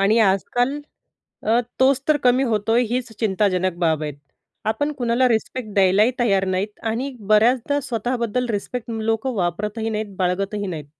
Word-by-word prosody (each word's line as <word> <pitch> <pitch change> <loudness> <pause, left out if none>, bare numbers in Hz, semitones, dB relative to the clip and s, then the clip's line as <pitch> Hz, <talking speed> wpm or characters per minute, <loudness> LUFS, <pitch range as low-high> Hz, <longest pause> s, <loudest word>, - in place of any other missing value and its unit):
आणि 205 +4 +4
आजकाल 245 +8 -1 0.6
अ, 225 +2 +3 0.2
तोच 265 +1 +4
तर 305 -1 +4
कमी 255 0 +3
होतोय, 225 -1 +1
हीच 250 0 -2
चिंताजनक 190 -4 +1
बाब 160 -2 +1
आहे. 150 - -3 0.6
आपण 290 +7 -1
कुणाला 245 0 +2
रिस्पेक्ट 230 +1 -2
द्यायलाही 200 +4 +4
तयार 195 -5 +2
नाहीत 190 +3 -2
आणि 250 +5 -2 0.2
बऱ्याचदा 240 +6 +3
स्वतःबद्दल 245 -1 -2
रिस्पेक्ट 230 +3 -4
लोकं 225 +3 -1
वापरतही 210 +4 -2
नाहीत, 215 -2 -4
बाळगतही 195 +3 -1
नाहीत. 160 -5 -5
220 Hz, 140 wpm, -22 LUFS, 195-245 Hz, 0.6 s, आणि